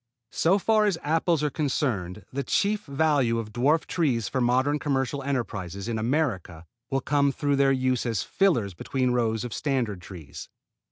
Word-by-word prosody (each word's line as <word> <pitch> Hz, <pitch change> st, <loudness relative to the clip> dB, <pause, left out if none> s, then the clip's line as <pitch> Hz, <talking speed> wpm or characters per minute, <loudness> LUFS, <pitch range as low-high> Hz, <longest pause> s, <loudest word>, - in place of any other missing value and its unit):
So 180 Hz, +4 st, +3 dB
far 215 Hz, +1 st, +3 dB
as 195 Hz, -5 st, +1 dB
apples 160 Hz, +1 st, +1 dB
are 150 Hz, -, 0 dB
concerned 115 Hz, -, -2 dB
the 140 Hz, -, -1 dB
chief 205 Hz, +9 st, 0 dB
value 140 Hz, -5 st, +1 dB
of 110 Hz, -2 st, -5 dB
dwarf 145 Hz, +7 st, +2 dB
trees 130 Hz, -10 st, 0 dB
for 130 Hz, -, -1 dB
modern 130 Hz, +5 st, +2 dB
commercial 140 Hz, -1 st, -1 dB
enterprises 105 Hz, -8 st, -3 dB
in 115 Hz, -2 st, -2 dB
America 110 Hz, -, -1 dB, 0.2 s
will 135 Hz, 0 st, 0 dB
come 140 Hz, 0 st, +2 dB
through 145 Hz, 0 st, 0 dB
their 135 Hz, 0 st, +4 dB
use 130 Hz, -2 st, 0 dB
as 115 Hz, -3 st, -1 dB
fillers 135 Hz, -, +1 dB
between 125 Hz, +8 st, -1 dB
rows 115 Hz, -2 st, 0 dB
of 120 Hz, -3 st, -5 dB
standard 120 Hz, -10 st, -1 dB
trees. 80 Hz, -6 st, -10 dB
130 Hz, 165 wpm, -26 LUFS, 115-145 Hz, 0.2 s, their